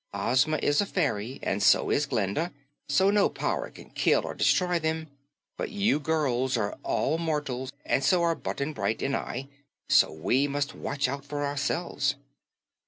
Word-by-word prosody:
Ozma 130 Hz, +6 st, +2 dB
is 145 Hz, +4 st, +3 dB
a 200 Hz, -, -2 dB
fairy, 130 Hz, -, -1 dB
and 100 Hz, +1 st, -1 dB
so -, -, +4 dB
is 145 Hz, -, +2 dB
Glinda, 120 Hz, -, -1 dB, 0.4 s
so 190 Hz, +8 st, +4 dB
no 205 Hz, -1 st, +4 dB
power -, -, -2 dB
can -, -, -14 dB
kill -, -, +2 dB
or -, -, -4 dB
destroy 180 Hz, -1 st, +2 dB
them, 160 Hz, 0 st, -2 dB, 0.5 s
but -, -, -3 dB
you 205 Hz, -5 st, +1 dB
girls 135 Hz, -5 st, 0 dB
are 105 Hz, -2 st, -1 dB
all 160 Hz, -, 0 dB
mortals 145 Hz, -6 st, -2 dB
and 135 Hz, -, +1 dB
so 180 Hz, -2 st, +3 dB
are 170 Hz, -1 st, +3 dB
Button 155 Hz, -1 st, -4 dB
Bright 110 Hz, -5 st, -2 dB
and 135 Hz, 0 st, 0 dB
I, 130 Hz, +3 st, -4 dB, 0.4 s
so -, -, +5 dB
we 125 Hz, -, +1 dB
must 145 Hz, 0 st, -2 dB
watch 145 Hz, -1 st, -2 dB
out 140 Hz, +2 st, -4 dB
for 145 Hz, 0 st, -3 dB
ourselves." 140 Hz, 0 st, -1 dB
145 Hz, 170 wpm, -27 LUFS, 130-160 Hz, 0.5 s, so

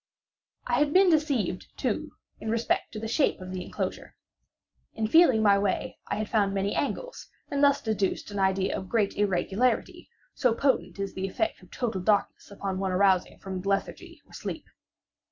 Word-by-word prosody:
I 245 Hz, 0 st, +1 dB
had 295 Hz, 0 st, +2 dB
been 375 Hz, -1 st, +6 dB
deceived, 280 Hz, -, 0 dB
too, -, -, -2 dB, 0.3 s
in 220 Hz, -, -5 dB
respect 230 Hz, +1 st, 0 dB
to 215 Hz, -, -5 dB
the 225 Hz, -, -4 dB
shape 275 Hz, +6 st, +1 dB
of 185 Hz, 0 st, -8 dB
the 185 Hz, -1 st, -4 dB
enclosure. -, -, -5 dB, 0.8 s
In 220 Hz, -, -1 dB
feeling 255 Hz, -4 st, +5 dB
my 200 Hz, -1 st, +5 dB
way 200 Hz, -1 st, -2 dB
I -, -, -1 dB
had 215 Hz, 0 st, -2 dB
found 200 Hz, -3 st, +1 dB
many 195 Hz, +1 st, 0 dB
angles, -, -, -3 dB, 0.2 s
and 285 Hz, 0 st, +1 dB
thus 280 Hz, 0 st, +4 dB
deduced 210 Hz, -2 st, -1 dB
an 205 Hz, -, -4 dB
idea 190 Hz, 0 st, +1 dB
of 190 Hz, -, -6 dB
great 215 Hz, -4 st, +1 dB
irregularity; 205 Hz, +4 st, 0 dB, 0.2 s
so 245 Hz, -3 st, +2 dB
potent 265 Hz, -3 st, 0 dB
is 195 Hz, -1 st, -3 dB
the 190 Hz, 0 st, -3 dB
effect 330 Hz, -, -2 dB
of 180 Hz, -, -17 dB
total 225 Hz, -7 st, -2 dB
darkness 200 Hz, +1 st, 0 dB
upon 195 Hz, -2 st, -4 dB
one 190 Hz, -1 st, -1 dB
arousing 185 Hz, -1 st, +2 dB
from 190 Hz, -1 st, -5 dB
lethargy 195 Hz, +1 st, -3 dB
or -, -, -21 dB
sleep! -, -, -6 dB
205 Hz, 175 wpm, -27 LUFS, 195-250 Hz, 0.8 s, been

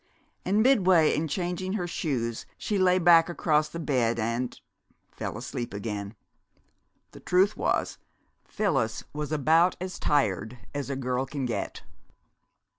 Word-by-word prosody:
And 205 Hz, +4 st, +2 dB
midway 185 Hz, -, +4 dB
in 160 Hz, +2 st, -1 dB
changing 180 Hz, +3 st, -3 dB
her 195 Hz, -4 st, -1 dB
shoes 125 Hz, -9 st, -3 dB
she 205 Hz, -2 st, -1 dB
lay 185 Hz, -1 st, +4 dB
back 170 Hz, -1 st, +6 dB
across 155 Hz, -3 st, +1 dB
the 165 Hz, -, -7 dB
bed 125 Hz, -7 st, +1 dB
and 115 Hz, +2 st, -2 dB, 0.5 s
fell -, -, -5 dB
asleep 120 Hz, -4 st, -5 dB
again. 100 Hz, 0 st, -5 dB, 1.0 s
The -, -, -12 dB
truth 190 Hz, +3 st, +2 dB
was, -, -, -1 dB, 0.4 s
Phyllis 135 Hz, -, -1 dB
was 150 Hz, 0 st, -4 dB
about 160 Hz, +4 st, +3 dB
as 185 Hz, +1 st, -5 dB
tired 115 Hz, -, 0 dB, 0.2 s
as 140 Hz, -1 st, -4 dB
a 140 Hz, -, -2 dB
girl 130 Hz, 0 st, -2 dB
can 140 Hz, -3 st, -3 dB
get. 120 Hz, -, -4 dB
150 Hz, 135 wpm, -27 LUFS, 125-180 Hz, 1.0 s, back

